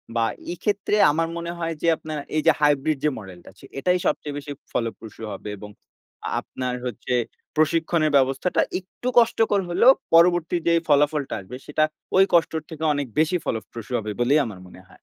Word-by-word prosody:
বা 115 -1 +2 0.3
এক্ষেত্রে 205 +2 -1 0.2
আমার 165 +2 0
মনে 170 0 -4
হয় 165 -1 -2
যে 170 - 0
আপনার 155 -1 -6 0.2
এই 155 - +2
যে 160 - +7
হাইব্রিড 145 0 +2
যে - - +5
মডেলটা 95 -4 -11
আছে। - - -16
এটাই 180 +4 +2
সবচেয়ে 150 -1 -1
বেশি 145 0 -7 0.2
ফলপ্রসূ 115 -1 -4
হবে 105 - -7
এবং 105 +1 -10 0.7
আপনার 125 -1 -5
হচ্ছে 125 +1 -4 0.4
প্রশিক্ষণের 155 0 +2
ব্যবস্থাটা 135 +6 +1 0.2
একটু 190 +6 -9
কষ্টকর 225 -3 +2
হলেও 240 +9 +6 0.2
পরবর্তী 175 0 +4
যেই 170 0 +4
ফলাফলটা 145 -1 +2
আসবে 110 +7 -10
সেটা 150 +1 +1 0.3
ওই 190 - +8
কষ্টর 160 -1 +3
থেকে 160 0 -7
অনেক 145 -2 -2
বেশি 165 +3 +3
ফলপ্রসূ 110 +1 -5
হবে 105 0 -5
বলেই 140 +5 +4
আমার 100 -5 -8
মনে 90 - -14
হয়। - - -19
150 Hz, 170 wpm, -23 LUFS, 125-170 Hz, 0.7 s, ওই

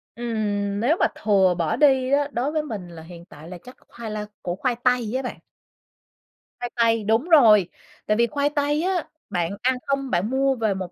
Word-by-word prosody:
Ừm, 205 -4 -2
nếu 270 +10 +2
mà - - +4
thừa 195 -4 +2
bỏ 165 +1 0
đi 265 -1 +3
á, 285 0 +2
đối 260 +3 -1
với 310 -1 -1
mình 210 -11 -6
là 165 -1 -11
hiện 170 0 -12
tại 155 -3 -14
là 180 - -8
chắc 250 - -13
khoai 230 -2 -8
la 210 0 -4 0.2
củ 175 - -3
khoai 245 +5 -1
tây 250 -3 +1
á 260 - 0
bạn. 250 - -6 1.2
Khoai 245 0 -4
tây, 230 -2 +2
đúng 225 - +1
rồi. 220 - +6 0.4
Tại 210 - +1
vì 235 0 +3
khoai 285 +5 0
tây 295 +1 0
á, 365 -3 0 0.3
bạn 175 -4 -1
ăn 260 +1 +2
không 275 -1 -1
bạn 185 +1 0
mua 270 +1 +1
về 220 -4 0
1 185 -2 -6
230 Hz, 210 wpm, -23 LUFS, 200-270 Hz, 1.2 s, rồi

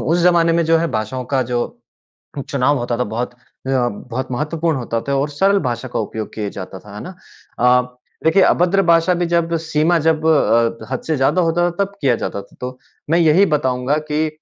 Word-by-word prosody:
उस 165 +3 +1
ज़माने 170 -1 +4
में 170 0 +2
जो 165 0 +3
है 165 0 0
भाषाओं 110 +4 -3
का 130 - +3
जो 120 - +1 0.9
चुनाव 140 +1 +2
होता 120 -1 -2
था, 125 - +1
बहुत 120 +3 -4
अ, - - -29 0.3
बहुत 125 0 -2
महत्वपूर्ण 155 +3 -1
होता 115 -2 -3
था 140 - +1
और 145 - -1
सरल 195 +7 +2
भाषा 120 +2 -4
का - - 0
उपयोग 110 -1 -5
किए 105 -2 -3
जाता 95 0 -8
था, 105 +1 -13
है 105 - -7
ना? 185 +1 -9 0.4
अ, 125 0 +3 0.3
देखिए, 160 +5 +4
अभद्र 180 +2 +3
भाषा 170 +1 +4
भी 175 0 0
जब 170 0 0
सीमा 160 +1 +1
जब 160 -1 +2
अ, 115 -6 +2
हद 130 - -2
से 160 - +1
ज़्यादा 150 +7 +2
होता 175 +1 +2
था 170 - -10
तब 200 - -7
किया 130 -3 +3
जाता 100 - -4
था। 100 - -20
तो 125 0 -5 0.3
मैं 165 - +3
यही 170 +4 +5
बताऊँगा 140 -3 0
कि 155 +1 +1
145 Hz, 210 wpm, -19 LUFS, 125-165 Hz, 0.9 s, यही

